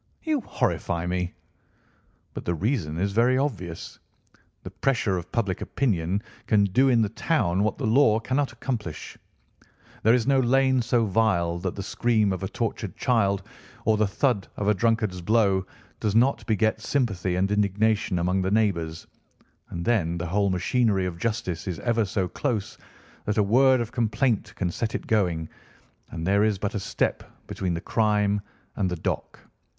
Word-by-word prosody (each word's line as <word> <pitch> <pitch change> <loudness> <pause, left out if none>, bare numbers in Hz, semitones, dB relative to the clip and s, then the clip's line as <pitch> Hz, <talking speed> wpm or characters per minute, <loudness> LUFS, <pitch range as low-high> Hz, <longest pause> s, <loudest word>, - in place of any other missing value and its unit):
"You 310 -4 0
horrify 85 - -1
me!" 90 0 -2 1.0
"But - - -6
the 85 - 0
reason 90 - -1
is 100 +3 0
very 120 +5 +3
obvious. 95 - -4 0.6
The - - -8
pressure 125 -8 0
of 90 -1 -6
public 100 -5 -1
opinion 100 -5 -1 0.2
can 105 -2 +4
do 125 +8 +3
in 120 -3 +4
the 105 - -1
town 110 - 0
what 110 - 0
the - - -3
law 110 -1 +4
cannot 130 +4 -1
accomplish. 120 -6 -5 0.9
There 115 +2 +5
is 120 -3 0
no 135 -1 +3
lane 130 +1 +3
so 115 0 +1
vile 90 -5 +1
that 90 0 -3
the 100 - -5
scream 110 -2 +1
of 95 - -5
a 95 - -2
tortured - - -4
child, 100 -5 +1 0.4
or 110 - +4
the 105 -1 +2
thud 105 -1 0
of 105 - -2
a 105 - +5
drunkard's 110 -3 0
blow, 100 -1 +2 0.3
does 105 -1 -1
not 125 +5 +3
beget 110 -1 +1
sympathy 105 -10 0
and 95 +2 +1
indignation 105 0 +1
among 90 +2 +1
the 95 - 0
neighbours, 85 -7 0 0.6
and 85 0 -5
then 85 -8 +1
the 85 - -3
whole 100 +3 +1
machinery 95 +1 +1
of 85 -2 -5
justice 105 -6 -2
is 90 -3 -3
ever 115 -2 +1
so 95 -1 -1
close 115 -2 -3 0.5
that 105 - -1
a 105 - +4
word 130 +5 +4
of 120 -2 -3
complaint 115 0 0
can 90 -3 -1
set 110 +5 -3
it - - -4
going, 90 -7 +1 0.6
and 80 -1 -5
there 100 +2 +3
is 110 -2 +2
but 100 +2 -3
a 105 - -2
step - - -1 0.2
between 90 -3 -3
the - - -2
crime 105 -2 +1 0.4
and 95 -3 +1
the 90 - -2
dock. 80 - -4
105 Hz, 170 wpm, -25 LUFS, 95-115 Hz, 1.0 s, There